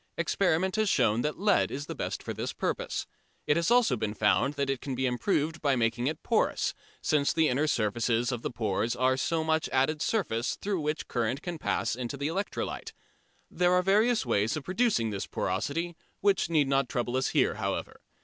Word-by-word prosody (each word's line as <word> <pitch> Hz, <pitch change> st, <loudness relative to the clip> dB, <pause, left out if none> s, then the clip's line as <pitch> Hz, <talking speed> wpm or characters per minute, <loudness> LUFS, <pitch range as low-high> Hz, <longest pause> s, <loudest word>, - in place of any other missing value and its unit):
Experiment 185 Hz, +2 st, +1 dB
has 215 Hz, -2 st, +2 dB
shown 115 Hz, -, +3 dB
that 150 Hz, +3 st, -2 dB
lead 205 Hz, -1 st, +3 dB
is 140 Hz, +2 st, -5 dB
the -, -, -5 dB
best -, -, -4 dB
for -, -, -4 dB
this -, -, -4 dB
purpose. -, -, -2 dB, 0.4 s
It 145 Hz, -, +3 dB
has 170 Hz, +4 st, +1 dB
also 240 Hz, -, +4 dB
been 110 Hz, -2 st, -3 dB
found 105 Hz, +7 st, +2 dB
that 140 Hz, -1 st, -1 dB
it 135 Hz, -2 st, -2 dB
can 135 Hz, -2 st, -4 dB
be 130 Hz, +1 st, -1 dB
improved 155 Hz, +5 st, 0 dB
by 140 Hz, -3 st, +2 dB
making 120 Hz, +1 st, 0 dB
it 155 Hz, -, -3 dB
porous, -, -, +1 dB, 0.3 s
since 145 Hz, -2 st, +2 dB
the 160 Hz, -1 st, +3 dB
inner 145 Hz, +5 st, +1 dB
surfaces 115 Hz, +1 st, +1 dB
of 120 Hz, -2 st, -3 dB
the -, -, -2 dB
pores 115 Hz, 0 st, -1 dB
are 130 Hz, +1 st, +2 dB
so 160 Hz, +4 st, 0 dB
much 160 Hz, 0 st, 0 dB
added 140 Hz, +4 st, +1 dB
surface 120 Hz, -, 0 dB
through 195 Hz, -4 st, -2 dB
which 150 Hz, +1 st, -2 dB
current 120 Hz, +3 st, -1 dB
can 175 Hz, -3 st, -5 dB
pass -, -, 0 dB
into 125 Hz, +2 st, -4 dB
the 140 Hz, +2 st, -1 dB
electrolyte. 195 Hz, +5 st, -4 dB, 0.6 s
There 180 Hz, 0 st, +2 dB
are 180 Hz, 0 st, +3 dB
various 215 Hz, -, +3 dB
ways 110 Hz, +1 st, +1 dB
of 150 Hz, -, -5 dB
producing 185 Hz, -, +1 dB
this 100 Hz, -1 st, -4 dB
porosity, 170 Hz, +4 st, -2 dB, 0.2 s
which 195 Hz, -4 st, +2 dB
need 155 Hz, -4 st, +3 dB
not 135 Hz, -2 st, +1 dB
trouble 120 Hz, 0 st, -2 dB
us 130 Hz, 0 st, +1 dB
here, -, -, +2 dB
however. -, -, -4 dB
145 Hz, 195 wpm, -29 LUFS, 120-170 Hz, 0.6 s, also